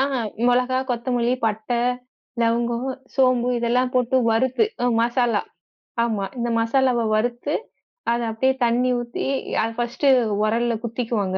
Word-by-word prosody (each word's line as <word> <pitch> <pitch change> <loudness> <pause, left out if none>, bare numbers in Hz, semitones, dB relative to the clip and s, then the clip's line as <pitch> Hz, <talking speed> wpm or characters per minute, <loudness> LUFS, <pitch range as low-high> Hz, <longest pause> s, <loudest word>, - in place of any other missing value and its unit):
ஆஹ, 275 +1 +1 0.3
மொளகா, 250 +1 +2
கொத்தமல்லி, 245 0 0
பட்ட, 220 +2 -3 0.7
லவங்கம், 235 +2 0 0.3
சோம்பு 255 -2 +3
இதெல்லாம் 250 +2 +1
போட்டு 250 0 +2
வறுத்து, 255 - +2 0.2
அ - - +3
மசாலா, 235 -2 +1 0.6
ஆமா, 215 -4 -1
இந்த 240 0 -1
மசாலாவ 245 +1 +2
வறுத்து, 240 +6 -1 0.6
அத 235 0 0
அப்டியே 260 +4 +1
தண்ணீ 240 +2 +2
ஊத்தி, 240 0 -4 0.4
அத 225 - -1
ஃபஸ்ட்டு 240 +4 -1 0.4
உரல்ல 230 +2 +1
குத்திக்குவாங்க. 225 -5 -2
240 Hz, 120 wpm, -22 LUFS, 230-250 Hz, 0.7 s, சோம்பு